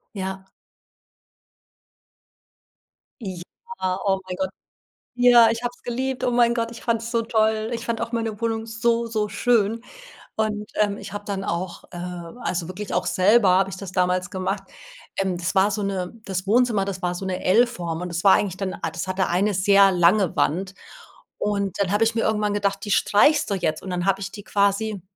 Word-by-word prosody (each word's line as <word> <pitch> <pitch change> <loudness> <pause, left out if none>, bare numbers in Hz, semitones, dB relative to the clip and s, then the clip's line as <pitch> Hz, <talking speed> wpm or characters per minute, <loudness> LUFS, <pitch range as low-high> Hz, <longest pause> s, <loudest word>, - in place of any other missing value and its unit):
Ja. 190 0 -5 2.7
Ja, 185 - -5
oh, 195 -1 +2
mein 180 - -4
Gott. 190 0 -1 0.7
Ja, 245 -2 +7
ich 230 +1 -3
habe 245 - -1
es - - -29
geliebt. 260 +2 -3
Oh, - - +2
mein 240 -1 +3
Gott, 230 -1 -1
ich 235 - -11
fand's 230 -1 -1
so 230 -1 +1
toll. 220 -1 +1
Ich 230 0 -4
fand 230 -1 -2
auch 230 - -3
meine 225 -2 -2
Wohnung 225 -1 -1
so, 230 +1 0
so 215 -2 -1
schön. 225 +1 +1 0.5
Und, 210 -1 -2
ähm, 205 -1 +1
ich - - -9
habe 205 0 -5
dann 195 -1 -3
auch 175 0 -4
äh, 175 - -8 0.4
also, 175 -6 -2
wirklich 190 +3 -6
auch, - - 0
selber 200 +2 +4
habe 190 +1 +3
ich 190 - -7
das 190 -1 -7
damals 180 0 0
gemacht. 195 +1 -3 0.5
Ähm, 190 -2 0
das 175 +2 -3
war 195 +2 +4
so 210 - -2
'ne 190 -2 -3
das 185 -1 -3
Wohnzimmer, 220 -1 +2
das 190 -2 -5
war 180 0 -1
so 190 - -5
'ne 185 -1 -3
L-Form, 185 -6 +1
und 180 - -4
das 170 0 -3
war 195 - +7
eigentlich 190 -3 +1
dann, 195 -1 -3
a 165 - -4
das 170 +3 -5
hatte 185 0 0
eine 195 +4 +1
sehr 195 +1 +5
lange 180 +1 +3
Wand. 185 +5 0 0.6
Und 200 -3 -2
dann 195 -2 +1
habe 205 +2 +3
ich 225 0 +2
mir 230 - +1
irgendwann 210 -2 0
gedacht, 200 -1 -1
die 205 - -3
streichst 285 +11 +4
du 200 - 0
jetzt. 155 -4 -1
Und 190 - -7
dann 180 0 -2
habe 195 0 +2
ich 195 0 -5
die 205 - -9
quasi 200 0 0
200 Hz, 195 wpm, -23 LUFS, 185-225 Hz, 2.7 s, Ja